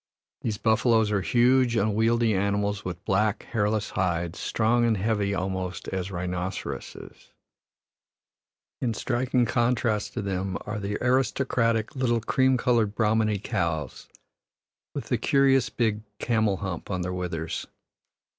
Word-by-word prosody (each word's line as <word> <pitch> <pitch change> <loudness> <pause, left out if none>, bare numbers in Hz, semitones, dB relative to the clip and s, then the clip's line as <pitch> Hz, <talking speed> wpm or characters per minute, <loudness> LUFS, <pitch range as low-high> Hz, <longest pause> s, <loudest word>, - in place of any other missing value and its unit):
These 110 -3 -2
buffaloes 110 0 +3
are 100 -2 +1
huge, 125 +3 +3
unwieldy 110 +2 +2
animals 100 +1 0
with 90 -2 -6
black, 105 +2 +1
hairless 105 -1 0
hides, 85 -1 -1
strong 115 +2 +1
and 115 -2 +2
heavy 100 -1 0
almost 95 -1 -3
as 95 0 -3
rhinoceroses. 90 0 -5 1.5
In 115 -3 0
striking 125 +1 +1
contrast 115 -4 0
to 115 - -2
them 95 0 -2
are 105 +1 -4
the 100 +1 -3
aristocratic 120 -3 +1
little 120 -3 +1
cream 130 +3 +2
colored 115 -4 +1
Brahmani 110 -1 +2
cows, 85 - -3 0.9
with - - -4
the - - +1
curious 135 -3 +3
big 110 -3 0 0.2
"camel 110 -5 +1
hump" 95 -4 -5
on 90 -3 -2
their 90 +1 -3
withers. 85 -3 -4
105 Hz, 125 wpm, -26 LUFS, 95-120 Hz, 1.5 s, buffaloes